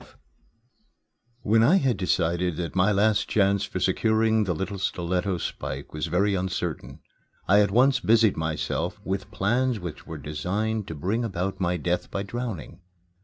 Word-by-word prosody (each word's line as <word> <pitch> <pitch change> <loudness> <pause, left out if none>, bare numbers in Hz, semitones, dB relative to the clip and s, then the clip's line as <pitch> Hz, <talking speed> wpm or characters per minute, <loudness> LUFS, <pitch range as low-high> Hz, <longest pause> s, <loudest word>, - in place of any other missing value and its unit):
XII - - -16 1.4
When 110 +2 +4
I 135 +11 +5
had 135 - +2
decided 85 -2 0
that 85 +1 -4
my 100 +3 +3
chance 100 -1 +1
for - - -5
securing 110 0 +2
the 90 -3 -1
little 95 +3 -4
stiletto 90 0 -1
spike 70 -3 -5
was 75 +2 -2
very 100 +5 +1
uncertain, 95 -1 -3 0.5
I 100 +3 +6
at 100 - +2
once 130 +6 +4
busied 110 -2 +4
myself 80 -1 -2
with 95 0 -3
plans 120 +4 0
which 85 -4 -8
were - - -6
designed 100 +8 -2
to 80 - -6
bring 100 +11 -1
about 95 -3 -3
my 90 -1 0
death 85 +3 -2
by 100 - -3
drowning. 100 - -6
95 Hz, 155 wpm, -26 LUFS, 90-110 Hz, 1.4 s, I